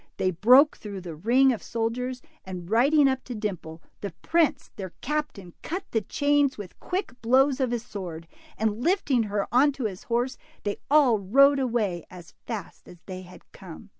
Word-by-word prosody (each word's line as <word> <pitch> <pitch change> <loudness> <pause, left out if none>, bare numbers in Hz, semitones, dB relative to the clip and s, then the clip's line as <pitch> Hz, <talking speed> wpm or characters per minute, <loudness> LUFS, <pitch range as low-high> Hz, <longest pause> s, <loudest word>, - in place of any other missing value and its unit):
They 185 - +1
broke 250 - +5
through 200 -3 -7
the 175 -2 -7
ring 245 - +3
of 225 - -6
soldiers, 245 +2 -3 0.2
and 180 -2 -7
riding, 275 - +4
up 265 -1 -1
to 250 - -6
Dimple, 180 -7 -5 0.2
the 200 -4 -5
prince, 330 -2 +1
their 190 -3 -7
captain, 295 - -3
cut 365 +4 -4
the 225 - +1
chains 285 +4 +1
with 205 -4 -10
quick 370 +2 -3
blows 265 +4 +3
of 260 -2 +1
his 240 -1 -3
sword, 170 -5 -7 0.3
and 220 +1 -1
lifting 325 - +2
her 200 -1 -1
on 275 +4 +5
to 270 - -6
his 190 -4 -5
horse, 245 +2 -1 0.2
they 205 -1 -2
all 275 -7 +5
rode 275 +8 +5
away 220 -9 -1
as 175 -2 -13
fast 220 -4 -7
as 180 - -13
they 185 -1 -7
had 180 0 -15
come. 190 +3 -12
230 Hz, 180 wpm, -26 LUFS, 190-270 Hz, 0.3 s, broke